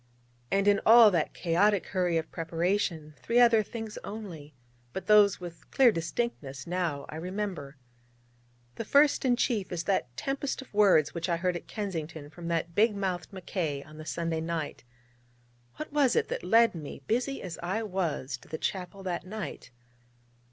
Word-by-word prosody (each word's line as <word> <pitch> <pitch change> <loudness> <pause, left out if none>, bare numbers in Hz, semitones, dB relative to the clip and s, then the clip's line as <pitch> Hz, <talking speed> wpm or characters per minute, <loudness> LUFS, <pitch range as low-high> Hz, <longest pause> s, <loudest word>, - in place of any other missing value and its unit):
And 195 +1 +1
in 205 0 +4
all 225 -1 +8
that 170 -4 0
chaotic 190 +3 +2
hurry 180 -3 0
of 160 0 -3
preparation, 165 -1 -1
three 235 +1 +2
other 235 -2 +6
things 220 0 -6
only, 175 -9 -8 0.4
but 190 - -5
those 210 -1 +5
with 175 -2 -10
clear 260 -3 +5
distinctness 165 - -3
now, 170 -5 -2
I 155 - -6
remember. 180 -5 -4 1.0
The - - -3
first 285 +5 +4
and 245 -2 +3
chief 220 -8 0
is 170 -2 -2
that 145 -11 -1
tempest 275 0 -2
of 265 - -11
words 195 -8 +4
which 170 +1 -3
I 170 - +1
heard 180 +1 0
at 175 - -7
Kensington 165 -8 -5
from 170 +1 -8
that 170 0 -1
big 215 +3 +3
mouthed 185 -4 -3
Mackay 170 -7 -3
on 155 +1 -14
the 155 - -8
Sunday 165 -1 -2
night. 160 -4 -4 0.9
What 305 -1 -7
was 285 -4 +3
it - - +1
that - - -3
led 230 +5 +5
me, 150 -4 -8
busy 250 - -1
as 175 -3 -6
I 190 +6 -2
was, 165 -10 -2
to - - -19
that 160 - -6
chapel 190 +1 -3
that 180 -2 -3
night? 190 -4 -7
180 Hz, 170 wpm, -29 LUFS, 165-210 Hz, 1.0 s, all